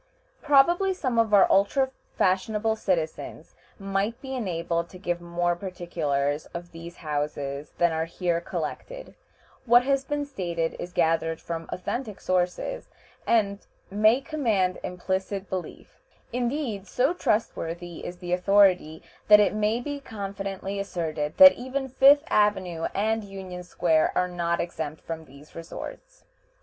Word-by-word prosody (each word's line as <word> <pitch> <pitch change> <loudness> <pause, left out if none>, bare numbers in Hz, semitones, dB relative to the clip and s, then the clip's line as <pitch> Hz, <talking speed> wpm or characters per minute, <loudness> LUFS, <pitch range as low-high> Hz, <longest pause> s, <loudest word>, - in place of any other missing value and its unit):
Probably 345 +7 +4
some 255 -9 0
of 225 -2 +2
our 200 -2 +7
ultra 260 +7 +3 0.3
fashionable 210 +4 +1
citizens 170 -7 -3 0.2
might 195 +4 -2
be 265 0 -7
enabled 170 -7 -2
to 185 - -11
give 175 -2 -3
more 175 0 0
particulars 155 -6 -2
of 175 0 -7
these 170 +1 -10
houses 145 -1 -3
than 170 -1 +3
are 160 0 -1
here 170 0 -1
collected. - - -6 0.5
What 240 +1 +7
has 275 +1 +1
been 290 +1 -2
stated 175 -11 -3
is 180 - -6
gathered 165 -1 +1
from 165 -1 -6
authentic 215 +3 -4
sources, 185 - -1 0.4
and 200 -3 +2 0.3
may 215 +5 +4
command 225 - 0
implicit 190 +2 -3
belief. 185 -1 -7 0.3
Indeed, 245 -5 -2
so 250 - +1
trustworthy 175 - -2
is 180 - -6
the 175 0 -4
authority 180 -4 +3 0.2
that 210 0 +9
it 205 - +3
may 215 +2 +1
be 285 +3 -5
confidently 195 -4 -5
asserted 160 -6 -3
that 280 0 +11
even 265 +2 -4
Fifth 275 +3 +6
Avenue 190 -6 +1
and 220 +2 0
Union 190 -2 -8
Square 170 -3 +1
are 180 - +2
not 170 -1 -1
exempt 160 -3 -4
from 160 -1 -6
these 140 +2 -16
resorts. - - -9
190 Hz, 135 wpm, -26 LUFS, 170-230 Hz, 0.5 s, that